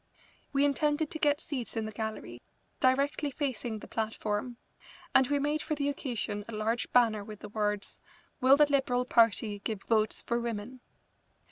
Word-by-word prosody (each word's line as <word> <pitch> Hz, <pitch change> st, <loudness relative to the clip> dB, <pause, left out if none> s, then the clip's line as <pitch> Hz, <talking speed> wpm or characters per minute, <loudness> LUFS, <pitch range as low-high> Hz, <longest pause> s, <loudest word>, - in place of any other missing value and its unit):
We 280 Hz, 0 st, +3 dB
intended 295 Hz, +1 st, +1 dB
to 315 Hz, -, -4 dB
get 290 Hz, -1 st, +3 dB
seats 255 Hz, -6 st, -5 dB
in 220 Hz, -, -1 dB
the 215 Hz, -, -5 dB
gallery, 215 Hz, -, -5 dB, 0.4 s
directly 280 Hz, +3 st, +2 dB
facing 255 Hz, -5 st, -3 dB
the -, -, -10 dB
platform 220 Hz, +1 st, -3 dB, 0.6 s
and 265 Hz, -1 st, +6 dB
we 285 Hz, -, +1 dB
made 295 Hz, +2 st, 0 dB
for 305 Hz, -, -2 dB
the 285 Hz, -1 st, 0 dB
occasion 240 Hz, -7 st, -3 dB
a 230 Hz, -, -7 dB
large 225 Hz, +2 st, -1 dB
banner 225 Hz, -4 st, +4 dB
with 210 Hz, 0 st, -10 dB
the 210 Hz, -, -8 dB
words: 210 Hz, -1 st, -2 dB, 0.4 s
"Will 265 Hz, +2 st, +6 dB
the 300 Hz, -, +7 dB
Liberal 265 Hz, -3 st, +1 dB
Party 225 Hz, -3 st, +3 dB
Give 200 Hz, -1 st, -4 dB
Votes 215 Hz, -2 st, +1 dB
for 235 Hz, 0 st, 0 dB
Women?" 235 Hz, +1 st, -4 dB
240 Hz, 165 wpm, -30 LUFS, 215-280 Hz, 0.6 s, the